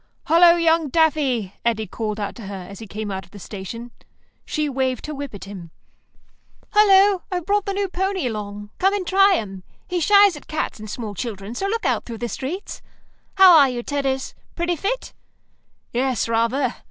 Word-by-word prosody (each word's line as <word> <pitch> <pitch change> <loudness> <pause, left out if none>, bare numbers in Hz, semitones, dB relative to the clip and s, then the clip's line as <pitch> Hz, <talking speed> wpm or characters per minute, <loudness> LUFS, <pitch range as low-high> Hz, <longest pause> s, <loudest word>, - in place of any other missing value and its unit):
"Hullo, 340 +1 +6
young 330 -2 +2
Daffy," 270 - +1
Eddy 225 -2 0
called 215 +2 -4
out 205 -1 -3
to 220 -5 -10
her, 195 -2 -7
as 200 0 -10
he 225 - -9
came 210 +1 -5
out 190 0 -4
of 175 - -19
the 205 - -13
station. 210 +5 -8 0.5
She 305 -1 -1
waved 260 -3 -1
her 305 - -5
whip 280 -5 -6
at 200 - -9
him. 190 -4 -9 1.0
"Hullo. 400 -2 +5
I've 355 -3 -2
brought 405 +1 +1
the 395 - -1
new 400 0 -1
pony 380 -2 -2
along. 205 -2 -5
Come 385 +2 +3
and 390 -3 -3
try 390 +1 +5
him. 195 - -5 0.2
He 360 -1 -1
shies 400 +2 +5
at 295 - -12
cats 310 -7 -3
and 215 0 -8
small 215 -1 -5
children, 205 -1 -5
so 385 +11 -2
look 455 +3 -2
out - - 0
through 230 -2 -7
the 240 +1 -4
streets. 325 - -5 0.5
How 380 -3 +8
are 280 -4 +7
you, 240 -1 -4
Tedders? 270 -2 -2 0.2
Pretty 345 0 0
fit?" 405 +10 -3 0.8
"Yes, 250 -2 0
rather. 230 +3 0
265 Hz, 190 wpm, -22 LUFS, 215-355 Hz, 1.0 s, How